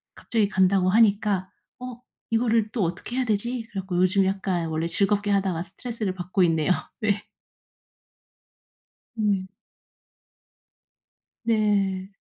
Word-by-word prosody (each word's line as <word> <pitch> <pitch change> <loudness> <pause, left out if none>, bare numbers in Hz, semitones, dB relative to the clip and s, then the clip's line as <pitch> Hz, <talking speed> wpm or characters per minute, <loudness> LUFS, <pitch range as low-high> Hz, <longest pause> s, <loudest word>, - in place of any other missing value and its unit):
갑자기 215 -3 0
간다고 190 -1 +3
하니까 205 -3 +3 0.3
'어 250 -1 -8 0.3
이거를 225 -1 +2
또 225 - 0
어떻게 180 +8 -3
해야 260 - +2
되지?' 230 +2 -1
그래 195 - -3
갖고 185 -1 -5
요즘 185 +2 +3
약간 190 -3 -1
원래 160 +1 -1
즐겁게 205 +3 +1
하다가 190 -4 +1
스트레스를 215 +1 -4
받고 185 +1 0
있네요. 165 0 +2 0.3
네. 205 -1 +1 2.0
음. 200 -3 +1 2.0
네. 200 -3 +1
195 Hz, 245 characters per minute, -25 LUFS, 185-215 Hz, 2.0 s, 간다고